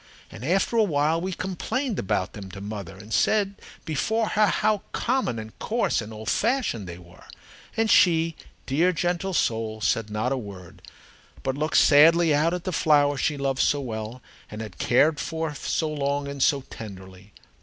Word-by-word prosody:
And 110 - -10
after 185 - +1
a 225 - +5
while 160 -2 +1
we 190 +2 -3
complained 190 +7 -3
about 95 0 -1
them 100 -2 -8
to 100 - -7
mother 100 -3 -7
and 105 +2 -9
said 200 - +1 0.2
before 220 +9 0
her 215 0 +3
how 210 0 +1
common 250 - 0
and 110 0 -8
coarse 230 - 0
and 105 0 -8
old 110 0 -9
fashioned 220 - 0
they 85 -1 -7
were. 85 -1 -16 0.5
And 225 0 +2
she, 165 -5 +4 0.3
dear, 165 +7 +2
gentle 175 +2 -1
soul, 110 -4 0
said 110 0 0
not 110 +4 -1
a 135 - 0
word, 100 -7 -10 0.6
but 130 - 0
looked 155 +2 0
sadly 160 +2 +6
out 155 +3 +2
at 180 - -6
the 185 - -3
flowers 145 -2 +3
she 150 - 0
loved 135 -1 0
so 145 - +2
well 115 -1 -6 0.3
and 105 - -8
had 110 -4 -8
cared 150 +5 +3
for 160 -2 -3
so 155 +3 -2
long 140 -1 -1
and 140 -1 -6
so 140 +1 +3
tenderly. 95 -2 -10
145 Hz, 175 wpm, -25 LUFS, 110-175 Hz, 0.6 s, sadly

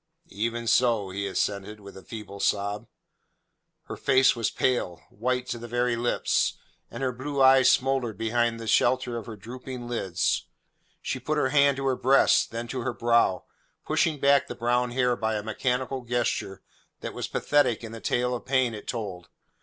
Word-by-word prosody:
"Even 115 +3 -2
so," 115 -4 +2
he 100 +1 -3
assented, 100 +2 -2
with 100 -1 -12
a 95 - -10
feeble 105 -2 -9
sob. 100 +1 -1 1.0
Her - - -7
face 130 -1 +4
was 115 -3 0
pale 105 -9 -1
white 125 +3 -1
to 120 - -3
the 120 - -8
very 120 0 0
lips, 120 +1 0 0.3
and - - -6
her 130 - +1
blue 135 +3 -5
eyes 130 -1 +6
smouldered 130 -6 +1
behind 115 +1 0
the 115 - -7
shelter 125 +2 +2
of 115 -3 -6
her 110 - -7
drooping 125 +3 -8
lids. 95 -8 -1 0.6
She - - -3
put 150 +5 -2
her 130 -3 +2
hand 140 -1 +4
to 135 - -3
her 135 -1 +2
breast, 135 +2 +4
then 115 +1 -5
to 130 - -3
her 120 - -2
brow, 115 -5 +2 0.4
pushing 155 -3 +1
back 140 0 +4
the - - -6
brown 120 +1 +1
hair 125 0 +1
by 110 -1 -1
a 105 - -3
mechanical 125 +4 -2
gesture 120 -5 -2 0.4
that - - -5
was - - -4
pathetic 145 -6 +1
in 115 - -7
the 115 -1 -9
tale 125 +1 0
of 120 - -4
pain 130 -3 +1
it 105 - -9
told. 95 -7 -5
120 Hz, 180 wpm, -26 LUFS, 110-130 Hz, 1.0 s, eyes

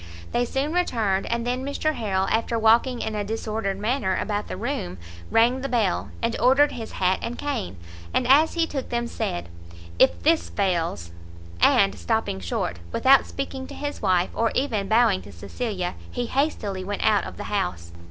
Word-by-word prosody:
They 245 - +1
soon 275 +5 -2
returned, 220 - 0
and 235 0 -1
then 250 +1 -1
Mr 285 +3 -1
Harrel, 195 -6 -1
after 230 +1 +1
walking 230 +3 +3
in 220 - -3
a 210 -1 -1
disordered 215 -2 -3
manner 210 -2 0
about 210 -1 -2
the - - -5
room, 210 - -3 0.3
rang 240 +3 +3
the 275 - -3
bell, 220 -7 0
and 230 0 +1
ordered 270 +4 +5
his 225 -2 -7
hat 185 0 +1
and 235 +1 -4
cane, 95 - -3 0.3
and 250 - +1
as 295 +6 +5
he 335 -1 +2
took 280 -5 -5
them, 240 0 -1
said 85 - -3 0.5
"If 85 -1 +4
this 85 0 +3
fails 165 - -1 0.3
" 85 - -17 0.2
and, 195 0 +5
stopping 225 - -1
short, 85 -1 -3
without 265 - +5
speaking 270 -1 -5
to - - -9
his 290 0 -5
wife, 180 -1 +2
or 230 0 +1
even 225 -8 0
bowing 220 -3 +3
to 100 - -12
Cecilia, 180 - -4 0.2
he 245 - -3
hastily 230 -8 -1
went 200 +1 -3
out - - +3
of - - -8
the - - -5
house. 85 -1 -2
225 Hz, 180 wpm, -24 LUFS, 185-255 Hz, 0.5 s, ordered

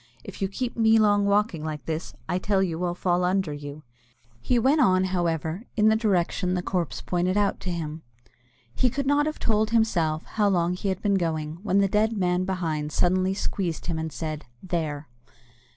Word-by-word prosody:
If - - -10
you 195 - +2
keep 240 +5 -4
me 225 -1 +4
long 205 -2 +3
walking 200 -5 +1
like 155 -2 -5
this, 160 +1 -4
I 180 - 0
tell 195 0 +1
you 170 -1 -2
I'll 175 -1 -1
fall 180 0 +1
under 180 -3 +1
you." 145 +1 -8 0.6
He 250 - +1
went 275 +6 +3
on, 185 -4 +4
however, 175 +1 -1
in 215 0 +5
the 220 - +4
direction 185 -4 +1
the 180 - -2
corpse 180 -4 -2
pointed 180 +2 0
out 205 -1 +1
to 185 - -4
him. 160 -2 -4 0.7
He 250 - +2
could 275 +3 -3
not 290 +2 +3
have 310 - -3
told, 215 -1 +1
himself, 175 -9 +1
how 210 -2 0
long 175 -2 +1
he 190 +2 -3
had 190 -1 -3
been 200 -2 +2
going, 160 -1 -2
when 200 -1 +2
the 195 - +3
dead 215 +3 +1
man 180 -1 +1
behind 160 -5 -2
suddenly 185 +3 +1
squeezed 180 -4 -3
him, 165 -2 -2
and 160 0 -3
said, 155 -2 -5 0.2
"There!" 155 -5 -3
185 Hz, 195 wpm, -25 LUFS, 165-205 Hz, 0.7 s, in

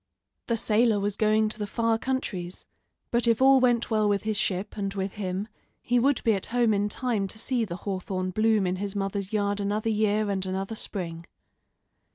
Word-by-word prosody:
The 235 - +1
sailor 220 0 +2
was 200 0 -1
going 215 0 +3
to 215 - -3
the 210 - -2
far 230 +2 0
countries, 195 -10 -3 0.5
but 235 0 +1
if 230 -1 +3
all 265 0 +6
went 240 -2 +2
well 215 -1 +2
with 200 -1 +1
his 215 0 -1
ship, 195 0 -1
and 200 -2 -2
with 195 0 -2
him, 195 0 -3 0.3
he 245 0 +1
would 270 +2 +2
be 225 - +4
at 195 - -1
home 235 -2 +2
in 205 +1 +1
time 220 -3 -1
to 205 - -2
see 240 +1 -1
the 170 -4 -5
hawthorn 185 -1 -2
bloom 215 0 +2
in 180 0 -1
his 200 +1 -4
mother's 195 -1 -2
yard 205 -1 0
another 210 +2 -1
year 210 -1 +1
and 190 -1 -1
another 195 +3 -3
spring. 170 -5 -5
210 Hz, 200 wpm, -27 LUFS, 195-225 Hz, 0.5 s, all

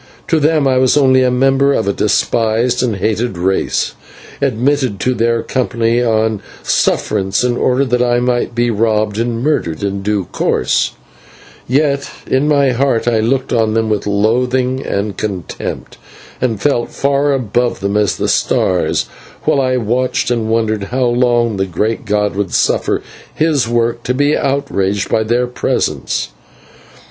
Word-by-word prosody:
To 165 - +3
them 150 -1 +2
I 130 -1 +2
was 130 +2 +3
only 130 -2 +4
a 130 - +3
member 135 +2 +2
of 110 - -1
a 100 - +1
despised 115 +3 +1
and 120 -4 0
hated 110 +1 -1
race, 95 +2 0 0.5
admitted 130 -3 0
to 130 - +1
their 115 -1 0
company 115 -1 0
on 110 -2 +1 0.2
sufferance 95 +3 0
in 125 -1 +1
order 130 +2 +1
that 125 -1 0
I 120 0 +2
might 120 -1 -1
be 120 0 +1
robbed 110 -1 0
and 115 0 -2
murdered 100 - -1
in 100 0 -2
due 100 -1 -1
course, - - 0 0.8
but 140 +1 +1 0.2
in 135 +3 +1
my 140 -3 +3
heart 125 -2 0
I 115 -2 +2
looked 130 +4 0
on 110 -2 +1
them 110 -1 +1
with 105 -1 -1
loathing 125 +5 +1
and 100 0 -2
contempt, 100 -5 -5 0.4
and 115 -5 0
felt 120 -1 0
far 140 +1 +1
above 120 -3 0
them 100 +1 -2
as 105 -3 +2
the - - -1
stars, - - +1 0.4
while 140 - +2
I 130 -1 +1
watched 125 +2 0
and 115 -2 -1
wondered 110 -2 0
how 125 +4 -1
long 120 -2 +1
the 95 0 -1
great 105 +7 -2
God 105 -1 0
would 100 -2 -2
suffer - - +1 0.3
his 155 -6 +1
world 120 0 0
to 125 - 0
be 145 +2 +2
outraged 100 -8 -1
by 110 - +2
their 120 +3 +1
presence. 125 - -2
120 Hz, 155 wpm, -15 LUFS, 110-130 Hz, 0.8 s, only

